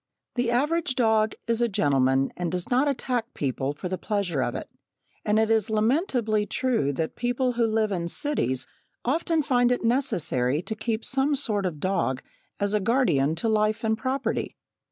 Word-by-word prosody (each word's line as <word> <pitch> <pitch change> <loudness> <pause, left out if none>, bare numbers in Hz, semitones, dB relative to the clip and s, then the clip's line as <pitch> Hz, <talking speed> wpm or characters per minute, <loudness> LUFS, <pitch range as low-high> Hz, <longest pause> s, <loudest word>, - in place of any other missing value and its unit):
The 245 -1 0
average 285 +3 +1
dog 220 -3 +2
is 230 0 0
a 240 - +4
gentleman 135 -6 +2
and 175 -2 -3
does 180 +3 -3
not 260 +4 +3
attack 250 -3 -2
people 135 0 -1
for 150 - -6
the 185 0 -3
pleasure 190 -8 -1
of 120 -1 -1
it, - - -5 0.6
and 210 +1 +2
it 220 0 +2
is 220 -2 +2
lamentably 220 - +1
true 245 - 0
that 160 +3 -3
people 245 +1 0
who 235 -1 +1
live 220 -1 +1
in 170 -3 -1
cities 170 - 0 0.4
often 320 +4 +1
find 245 -3 +3
it 245 - 0
necessary 155 - +1
to 220 - -3
keep 225 0 -2
some 275 +2 +1
sort 210 -8 0
of 175 - -4
a - - -13
dog 135 -7 -1 0.4
as 205 0 0
a 210 - +3
guardian 190 - +2
to 170 - -1
life 215 0 +1
and 220 0 +2
property. 260 +4 -2
220 Hz, 180 wpm, -26 LUFS, 175-250 Hz, 0.6 s, a